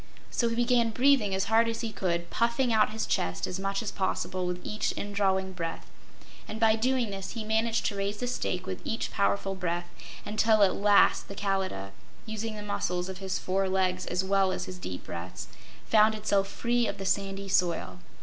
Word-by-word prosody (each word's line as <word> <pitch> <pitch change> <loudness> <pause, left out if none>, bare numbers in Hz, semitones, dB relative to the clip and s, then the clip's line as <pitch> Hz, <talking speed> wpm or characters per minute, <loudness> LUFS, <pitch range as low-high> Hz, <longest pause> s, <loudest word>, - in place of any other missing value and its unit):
So 235 - +1
he 230 - -2
began 240 -1 +3
breathing 245 -4 +3
as 190 - +1
hard 225 +2 +3
as 230 - -3
he 230 -2 -3
could, 170 -4 -2
puffing 235 +1 +1
out 215 -1 +4
his 220 +1 -3
chest 90 0 -1
as 180 - -4
much 195 +2 -1
as 215 - -3
possible 185 -1 -1
with 180 0 -2
each 215 - -1
indrawing 190 -2 0
breath, 165 -2 -4 0.6
and 215 - -6
by 220 -1 +5
doing 245 -1 +1
this 195 -1 -5
he 225 - -4
managed 220 +1 +1
to 205 - 0
raise 200 +1 -2
the 245 - -3
stake 185 -7 -2
with 185 -1 -5
each 225 - -2
powerful 200 -1 +1
breath, 175 -2 -2 0.4
until 215 0 +3
at 195 - +4
last 205 0 +4
the 200 - -8
Kalidah 190 - -2 0.3
using 220 0 -4
the 210 - -6
muscles 180 -3 -2
of 190 0 -6
his 190 -1 -2
four 190 +1 0
legs 185 -1 0
as 180 +1 0
well 195 0 +2
as 180 - -3
his 180 -1 -8
deep 90 - -6
breaths 85 -7 -6 0.4
found 215 0 +5
itself 200 -2 +1
free 235 +3 0
of - - -3
the 195 - -6
sandy 195 0 -1
soil. 170 - 0
200 Hz, 200 wpm, -29 LUFS, 185-220 Hz, 0.6 s, by